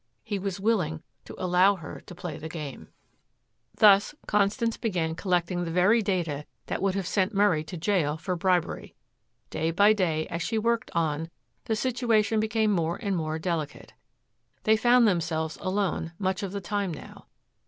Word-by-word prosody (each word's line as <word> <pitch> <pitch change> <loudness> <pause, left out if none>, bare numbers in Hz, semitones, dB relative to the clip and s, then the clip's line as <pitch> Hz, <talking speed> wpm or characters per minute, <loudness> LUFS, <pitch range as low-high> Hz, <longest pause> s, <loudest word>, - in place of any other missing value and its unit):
He 205 -3 -3
was 195 -1 -3
willing 200 - 0 0.2
to - - -10
allow 185 +2 +4
her 165 -5 -9
to 180 - -10
play 175 -3 -6
the 160 - -6
game. 150 -5 -7 0.9
Thus 205 +6 +5
Constance 210 +3 +1
began 175 -7 -1
collecting 175 0 0
the 170 - -3
very 185 +7 +4
data 170 -8 -2 0.2
that - - -3
would 195 -1 +1
have 195 -2 -2
sent 195 +3 0
Murray 195 -6 +3
to 165 +3 -7
jail 160 -3 0
for 180 +3 -3
bribery. 180 -1 -1 0.6
Day 160 - -1
by 205 +6 +5
day 165 -6 0
as 170 - -3
she 225 +5 -1
worked 230 +1 0
on, 160 -1 0 0.4
the 220 - 0
situation 225 -2 +1
became 220 0 +1
more 170 -3 0
and 200 -4 -1
more 155 -2 -2
delicate. 160 -3 -4 0.7
They 220 - +5
found 240 +1 +5
themselves 165 -4 -1
alone 185 -3 -1
much 190 -2 -1
of 195 -2 -4
the 200 0 -4
time 200 0 -2
now. 155 - -10
185 Hz, 165 wpm, -27 LUFS, 165-210 Hz, 0.9 s, Thus